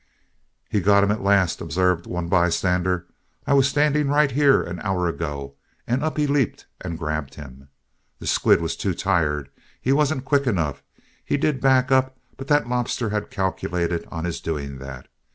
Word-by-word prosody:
"He 105 - 0
got 100 +1 +4
him 100 - +2
at 110 - -2
last," 100 -3 +2
observed 85 +1 0
one 90 -1 -3
bystander. 90 0 +1 0.4
"I 140 - +2
was 135 -1 +5
standing 150 0 +2
right 145 0 +3
here 140 +1 +4
an 85 0 -6
hour 95 -2 -1
ago, 70 -4 -5 0.3
and 125 +4 -1
up 155 -1 -2
he 150 - +2
leaped 140 -4 0 0.2
and 85 -3 -4
grabbed 75 -4 -4
him. 70 -1 -12 0.5
The - - -10
squid - - +3
was 80 0 -2
too 95 -4 -2
tired. 75 -8 0 0.3
He 130 - +1
wasn't 140 -2 +1
quick 140 -1 +1
enough. 85 - -1 0.4
He - - 0
did 145 -1 0
back 130 0 +3
up, 130 0 +2 0.2
but 135 - -9
that 145 -5 +3
lobster 120 -2 -1
he 105 0 0
calculated 90 -3 -2
on 80 0 -4
his 85 -1 -4
doing 70 -4 -4
that. 65 -1 -9
95 Hz, 175 wpm, -23 LUFS, 85-135 Hz, 0.5 s, was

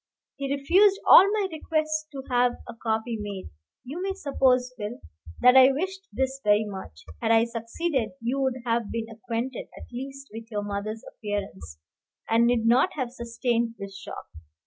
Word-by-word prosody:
He 275 -1 -3
refused 370 +9 +4
all 390 - +9
my 415 -2 +1
requests 310 -1 -1
to 270 -2 -7
have 245 -1 +3
a 240 - -7
copy 225 0 -2
made. 200 - -6 0.3
You 285 +8 -6
may 385 +1 -1
suppose, 255 -7 +1
Phil, 215 0 -6 0.4
that 250 +1 +7
I 260 +1 +8
wished 380 +7 -4
this 265 +4 -2
very 210 +1 +4
much. 190 - -9 0.2
Had - - 0
I 225 0 +5
succeeded, 235 - -2
you 240 +4 -1
would 260 -2 -1
have 230 -2 0
been 230 -1 -2
acquainted, 235 +2 -4
at - - -12
least, 270 +2 -7
with 225 0 -8
your 205 -2 -3
mother's 205 +2 -4
appearance, 195 - -6 0.5
and 230 +1 +4
need 240 -2 +2
not 255 +10 +4
have 255 -5 -3
sustained 235 -1 -1
this 200 -1 -8
shock. 195 - -8
240 Hz, 170 wpm, -26 LUFS, 225-275 Hz, 0.5 s, all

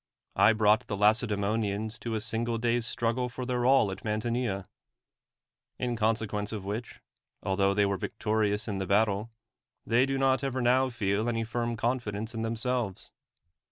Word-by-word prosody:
I 110 - +6
brought 110 0 +3
the 100 - -3
LacediLmionians 105 0 +1
to 115 -1 -3
a 110 - -2
single 115 +1 -1
day's 120 0 0
struggle 120 +2 -1
for 125 +1 -6
their 125 -1 0
all 130 -7 +5
at 95 - -6
^Nlantinea; 110 -2 -2 1.1
in 125 -1 -1
consequence 110 -2 -1
of 105 -3 -5
which, 110 +4 -5 0.4
altho 95 +1 +2
they 100 0 +4
were 100 -1 0
victorious 105 0 -1
in 100 -3 -2
the 95 - -3
battle, 105 +2 +2 0.6
they 125 +3 +3
do 135 0 -1
not 135 0 +2
ever 130 -1 -1
now 130 +2 +3
feel 110 -1 0
any 115 -1 -1
firm 120 +1 -2
confidence 115 -2 -2
in 115 - -3
them 115 +1 -1
selves. 120 -4 -3
110 Hz, 160 wpm, -29 LUFS, 105-120 Hz, 1.1 s, I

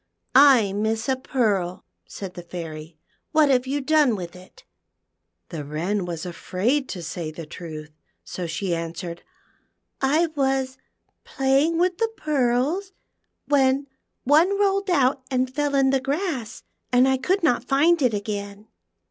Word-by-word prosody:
"I 255 -7 +6
miss 220 +2 -1
a 265 - +2
pearl," 210 -9 -1 0.2
said 190 -3 -7
the 180 - -8
Fairy; 160 -2 -8 0.4
"what 310 -2 +5
have 255 -1 +2
you 285 +2 -1
done 295 -4 +3
with 175 -3 -7
it? 185 - -16 0.4
" - - -54
The 160 -4 -5
Wren 175 +7 -2
was 170 -2 -5
afraid 210 +10 -1
to 180 -3 -5
say 165 0 -5
the 155 +1 -8
truth, 155 -1 -9 0.3
so 180 -2 -5
she 175 +3 -2
answered, 170 +1 -5 0.8
I 295 +5 +3
was 265 -2 0 0.4
playing 275 +5 +1
with 360 +1 +1
the 455 -1 +1
pearls, 295 +7 0 0.5
when 275 -1 +2 0.4
one 335 +9 +4
rolled 395 -1 +1
out 275 -5 +2
and 255 -1 -1
fell 290 0 0
in 270 -1 +4
the 270 -1 +1
grass, 275 - -3 0.3
and 250 +1 +5
I 265 0 +2
could 365 +8 0
not 245 -7 +2
find 305 +6 +3
it 245 -5 +2
again." 205 0 -5
255 Hz, 150 wpm, -24 LUFS, 185-285 Hz, 0.8 s, I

